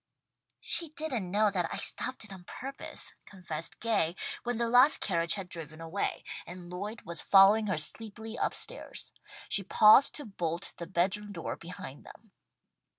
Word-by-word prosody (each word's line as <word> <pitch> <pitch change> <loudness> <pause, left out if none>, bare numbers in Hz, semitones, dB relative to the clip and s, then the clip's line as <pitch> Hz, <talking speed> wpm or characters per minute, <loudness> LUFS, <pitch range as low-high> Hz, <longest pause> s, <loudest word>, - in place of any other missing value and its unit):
"She 335 -2 0
didn't 280 - -3
know 210 +2 +3
that 180 -3 -1
I - - -3
stopped 255 -2 +2
it 210 -2 -8
on 185 -2 -11
purpose," 270 +7 -5
confessed 170 -5 -5
Gay, 200 -8 0 0.3
when 245 -1 -2
the 235 0 0
last 250 +5 +6
carriage 170 -3 0
had 195 -3 -6
driven 160 -2 -7
away, 165 +4 -3 0.2
and 175 0 -9
Lloyd 205 +5 -6
was 170 -1 -2
following 205 +2 +6
her 185 - 0
sleepily 220 +7 0
up - - -1
stairs. - - -3 0.3
She 200 - +3
paused 215 +7 +6
to 295 - -5
bolt 175 -4 -3
the 170 - -6
bed 185 +2 +2
room 210 0 -10
door 170 -5 -5
behind 165 -5 -10
them. 220 - -15
195 Hz, 165 wpm, -30 LUFS, 170-225 Hz, 0.3 s, last